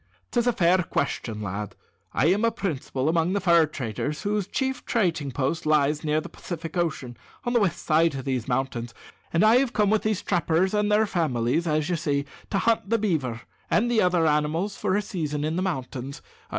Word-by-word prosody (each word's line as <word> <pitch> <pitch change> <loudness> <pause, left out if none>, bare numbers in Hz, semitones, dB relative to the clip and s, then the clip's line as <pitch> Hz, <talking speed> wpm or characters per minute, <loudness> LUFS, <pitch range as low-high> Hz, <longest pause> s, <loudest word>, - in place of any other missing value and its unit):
"'Tis 240 0 +1
a 245 - +3
fair 180 -1 +3
question, 120 -10 -2
lad. 100 +1 -4 0.4
I 130 - +1
am 205 +3 -1
a 230 - +5
principal 155 - -3
among 165 +2 +2
the 200 - +1
fur 170 -4 +4
traders 145 +2 -4
whose 205 -2 -1
chief 265 -1 -2
trading 165 - 0
post 145 +6 -1
lies 150 0 +2
near 155 0 +1
the - - -7
Pacific 165 -1 -7
Ocean, 145 -8 -2 0.3
on 240 - -1
the 240 - +4
west 195 -6 -1
side 160 -1 +3
of 130 - -5
these 130 -4 -2
mountains; 125 -3 -2 0.4
and 170 +4 +2
I 220 +3 +6
have 255 -2 +1
come 210 -1 +2
with 220 - +3
these 215 -3 -1
trappers 175 +1 +1
and 210 0 +1
their 215 +1 +4
families, 155 - 0
as 155 -1 +1
you 175 -1 0
see, 145 -3 -1 0.2
to 195 - 0
hunt 225 -1 +1
the 230 - +3
beaver 145 - -1 0.3
and 240 +3 +2
other 180 -3 +3
animals 155 +6 +1
for 185 - 0
a 210 - +1
season 150 -7 -3
in 155 +2 -1
the 180 - 0
mountains. 135 -6 -4
165 Hz, 200 wpm, -25 LUFS, 140-200 Hz, 0.4 s, I